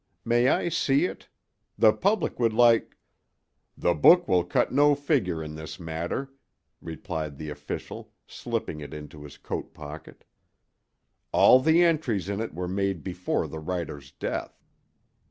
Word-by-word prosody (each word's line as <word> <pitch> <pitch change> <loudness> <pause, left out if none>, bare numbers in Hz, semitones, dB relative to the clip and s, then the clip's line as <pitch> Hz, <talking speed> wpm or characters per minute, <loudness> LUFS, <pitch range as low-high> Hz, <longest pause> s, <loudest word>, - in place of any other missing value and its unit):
May 120 +2 +3
I 140 - +2
see 145 0 +2
it? - - -7 0.5
The 110 -1 +6
public 200 -6 0
would 115 -2 +2
like—" 115 0 +3 0.8
"The 85 - +2
book 175 - +6
will 90 -1 +3
cut 90 - 0
no 145 0 +4
figure 125 - 0
in 75 0 -7
this 80 +3 -8
matter," 85 +11 -4 0.5
replied 80 -3 -5
the 75 0 -6
official, 75 0 -7
slipping 75 - -4
it 75 - -8
into 75 0 -10
his 75 - -12
coat - - -6
pocket; 75 +1 -10 1.1
"all 130 - +7
the 160 +5 +4
entries 145 - 0
in 100 0 -2
it 115 - -5
were 90 +1 -3
made 95 -3 -2
before 90 -1 -2
the 80 - -7
writer's 80 -4 -5
death." - - -5
90 Hz, 145 wpm, -26 LUFS, 80-130 Hz, 1.1 s, all